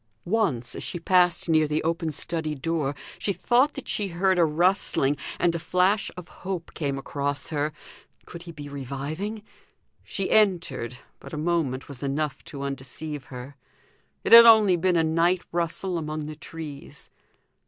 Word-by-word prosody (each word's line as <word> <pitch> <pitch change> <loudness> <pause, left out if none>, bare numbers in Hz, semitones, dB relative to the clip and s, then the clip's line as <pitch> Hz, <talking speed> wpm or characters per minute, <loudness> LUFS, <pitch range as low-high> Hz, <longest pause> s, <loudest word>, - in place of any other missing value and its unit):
Once, 175 - 0
as - - -6
she 175 - -4
passed 180 0 +3
near 155 -2 +3
the 150 +1 -1
open 165 0 -1
study 155 0 -3
door, 150 -1 -1 0.2
she 200 - -1
thought 245 - +2
that - - -7
she 205 - -1
heard 185 +1 +1
a - - +6
rustling, 160 -3 +2 0.2
and 175 -1 +2
a 170 - -2
flash 185 +5 +2
of 180 - -8
hope 185 -3 -5
came 140 -3 -2
across 140 +1 -3
her. 150 0 0 0.5
Could 170 - -9
he 170 -1 -9
be 145 -3 -9
reviving? 145 - -5 0.6
She 195 - -3
entered, 170 - +2 0.2
but - - -12
a - - -3
moment 155 -5 -1
was 140 -4 -5
enough 140 0 -2
to 140 -1 -7
undeceive 140 +1 -5
her; 130 +2 -9 0.7
it - - -2
had 235 0 +12
only 215 -5 +7
been 180 +1 +1
a 165 - +3
night 170 +3 +2
rustle 175 +1 -1
among 155 -1 -4
the 155 0 -6
trees. 155 -2 -8
160 Hz, 165 wpm, -26 LUFS, 145-180 Hz, 0.7 s, had